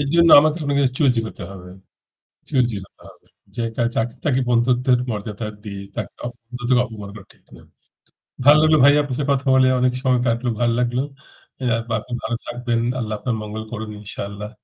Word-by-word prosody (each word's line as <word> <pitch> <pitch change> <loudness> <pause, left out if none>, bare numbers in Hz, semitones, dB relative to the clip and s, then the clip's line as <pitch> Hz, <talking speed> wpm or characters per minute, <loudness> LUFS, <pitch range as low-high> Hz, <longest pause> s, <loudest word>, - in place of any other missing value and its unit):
এরজন্য 165 +4 +4
আমাকে 155 +2 +1
আপনাকে 140 -1 +1 0.2
চুজি 130 -6 +3
হতে 105 - -10
হবে, 90 -2 -10 0.8
চুজি 125 -5 +1
হতে - - -28
হবে। - - -20 0.3
যে 120 - -2
তা - - -1
যাকে 115 +1 -1
তাকে 135 -4 +2
বন্ধুত্বের 125 +1 +3
মর্যাদা 105 +1 -5 0.2
দিয়ে 100 -2 -7
তাকে - - -5
অপ 120 - -3 0.2
নিজেদের 125 0 +1
অপমান 105 -4 -9
করা 105 - -10
ঠিক - - -30
না। - - -15 0.8
ভাল 145 +2 +8
লাগলো 155 0 +5
ভাই 145 - +8
আপনার 140 -3 -4
সাথে 145 -1 -2
কথা 140 +1 -2
বলে 130 0 +5
অনেক 125 0 +3
সময় 130 -2 +3
কাটল 120 +1 0
ভাল 120 -1 +3
লাগল। 125 0 0 0.6
অ্যা 125 -3 +1
বা - - -1
আপনি 125 - -14
ভালো 120 - -2
থাকবেন। 120 -1 -2 0.2
আল্লাহ 110 -3 -3
আপনার 125 +2 -2
মঙ্গল 105 +1 -6
করুন 110 -2 -5
ইনশাআল্লাহ। 100 0 -6
120 Hz, 185 wpm, -21 LUFS, 110-130 Hz, 0.8 s, ভাল